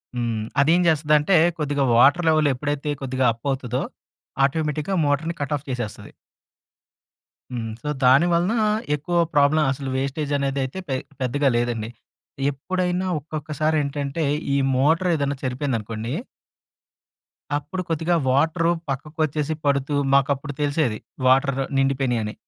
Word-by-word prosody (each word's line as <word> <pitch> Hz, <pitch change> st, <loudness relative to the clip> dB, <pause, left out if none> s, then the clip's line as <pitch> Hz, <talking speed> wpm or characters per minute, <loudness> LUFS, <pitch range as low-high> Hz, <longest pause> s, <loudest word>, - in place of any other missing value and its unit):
హ్మ్. 115 Hz, -3 st, -2 dB, 0.2 s
అదేం 165 Hz, +5 st, +4 dB
చేస్తదంటే 150 Hz, +2 st, +3 dB, 0.2 s
కొద్దిగా 145 Hz, -2 st, 0 dB
వాటర్ 145 Hz, +8 st, +5 dB
లెవెల్ 155 Hz, -2 st, +3 dB
ఎప్పుడైతే 145 Hz, +2 st, -3 dB
కొద్దిగా 130 Hz, -1 st, -1 dB
అప్ 115 Hz, +3 st, -21 dB
అవుతదో 130 Hz, -2 st, -2 dB, 0.6 s
ఆటోమేటిక్‌గా 155 Hz, +4 st, -1 dB
మోటార్‌ని 150 Hz, +4 st, 0 dB
కట్ 145 Hz, +1 st, -2 dB
ఆఫ్ 145 Hz, -, -14 dB
చేసేస్తది. 120 Hz, -4 st, -5 dB, 1.4 s
హ్మ్. 115 Hz, -2 st, -3 dB
సో, 150 Hz, -, -3 dB
దాని 130 Hz, +6 st, +6 dB
వలన, 175 Hz, +5 st, +2 dB, 0.4 s
ఎక్కువ 175 Hz, +4 st, -2 dB, 0.2 s
ప్రాబ్లమ్ 145 Hz, +2 st, +4 dB
అసలు 135 Hz, 0 st, -4 dB
వేస్టేజ్ 140 Hz, +2 st, -2 dB
అనేది 140 Hz, 0 st, -1 dB
అయితే 130 Hz, +8 st, -5 dB
పె 135 Hz, -, 0 dB, 0.3 s
పెద్దగా 135 Hz, +3 st, +1 dB
లేదండి. 120 Hz, -2 st, -1 dB, 0.6 s
ఎప్పుడైనా 180 Hz, +5 st, -2 dB
ఒక్కొక్కసారేంటంటే 150 Hz, 0 st, -2 dB, 0.3 s
ఈ -, -, +3 dB, 0.2 s
మోటర్ 160 Hz, +7 st, +2 dB
ఏదైనా 140 Hz, -2 st, -1 dB
చెడిపోయిందనుకోండి 120 Hz, -3 st, -3 dB, 1.4 s
అప్పుడు 150 Hz, +6 st, -5 dB
కొద్దిగా 165 Hz, +2 st, +1 dB
వాటరు 160 Hz, +5 st, +2 dB, 0.2 s
పక్కకొచ్చేసి 150 Hz, +2 st, -2 dB
పడుతూ, 140 Hz, 0 st, +1 dB, 0.2 s
మాకు 140 Hz, 0 st, +4 dB
అప్పుడు 145 Hz, +2 st, -7 dB
తెలిసేది, 145 Hz, -6 st, 0 dB, 0.3 s
వాటర్ 135 Hz, +1 st, +3 dB, 0.2 s
నిండిపోయినాయి 135 Hz, -3 st, +1 dB
అని. 105 Hz, 0 st, -4 dB
140 Hz, 120 wpm, -23 LUFS, 130-155 Hz, 1.4 s, దాని